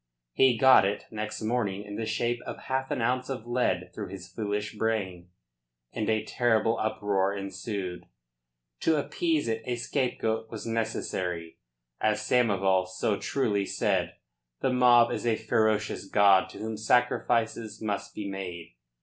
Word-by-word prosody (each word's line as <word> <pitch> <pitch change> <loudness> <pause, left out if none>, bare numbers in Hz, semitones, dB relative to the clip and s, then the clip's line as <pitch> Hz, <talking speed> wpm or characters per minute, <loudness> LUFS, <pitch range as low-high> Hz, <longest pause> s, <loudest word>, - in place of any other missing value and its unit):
He 130 -3 +4
got 130 +2 +7
it 100 +1 -1
next 110 0 -4
morning 110 -4 -1
in 105 0 -8
the 110 +1 -3
shape 120 +2 -1
of - - -5
half 130 0 -2
an 120 - -1
ounce 125 +2 0
of 125 -4 -4
lead 120 +1 0
through - - -5
his 95 0 -9
foolish 105 -1 -3
brain, 100 -5 -2 0.6
and 110 -1 -2
a 110 -1 +1
terrible 115 -2 +1
uproar 100 -2 0
ensued. 100 -1 -5 0.7
To 160 - +2
appease 155 0 0
it 110 0 -1
a 125 - -1
scapegoat 115 -2 -1
was 110 - -7
necessary. 95 -7 -3 0.4
As 105 -1 +1
Samoval 100 -5 +2
so 95 +2 -1
truly 105 -8 0
said, - - 0 0.5
the 130 - +1
mob 120 -2 +6
is - - -2
a 115 - +3
ferocious 110 -2 0
god 100 -2 +5
to - - -11
whom 110 +1 -4
sacrifices 115 -1 +1
must 105 -2 -4
be 105 - -4
made. 90 -5 -6
110 Hz, 150 wpm, -28 LUFS, 100-120 Hz, 0.7 s, got